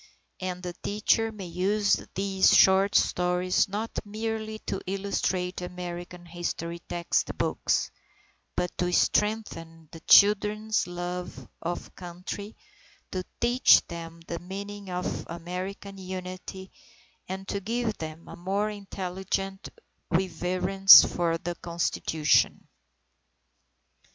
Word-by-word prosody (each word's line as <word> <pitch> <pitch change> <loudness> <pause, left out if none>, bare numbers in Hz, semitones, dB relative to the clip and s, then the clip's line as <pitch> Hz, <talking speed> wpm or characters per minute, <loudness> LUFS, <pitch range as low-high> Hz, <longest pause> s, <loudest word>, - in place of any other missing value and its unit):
And 180 -1 -4
the 180 -1 -4
teacher 215 +2 +1
may 205 -3 -8
use 195 +4 +1
these 195 0 +3
short 195 +1 +5
stories 180 +2 +2
not 215 +3 -3
merely 220 +1 -4
to 195 - -3
illustrate 190 -2 -1
American 175 0 -7
history 170 0 -4
textbooks, 170 0 -1 0.6
but 180 -1 -2
to 180 0 +1
strengthen 165 -7 0
the 165 - -10
children's 210 +3 +4
love 175 0 -5
of 175 +1 -4
Country, 185 +4 -7 0.6
to 185 -1 -3 0.2
teach 240 +2 +5
them 165 -1 -8
the 170 0 -5
meaning 200 +2 -7
of 180 0 -3
American 185 +4 -6
Unity, 185 +1 -7 0.6
and 190 +1 -5
to 200 - -1
give 225 +2 -2
them 160 +1 -7
a - - -9
more 200 +4 -1
intelligent 195 -1 -4 0.4
reverence 185 +2 +6
for 170 -1 0
the 175 +1 -4
Constitution. 170 -3 +1
185 Hz, 105 wpm, -27 LUFS, 175-200 Hz, 0.6 s, reverence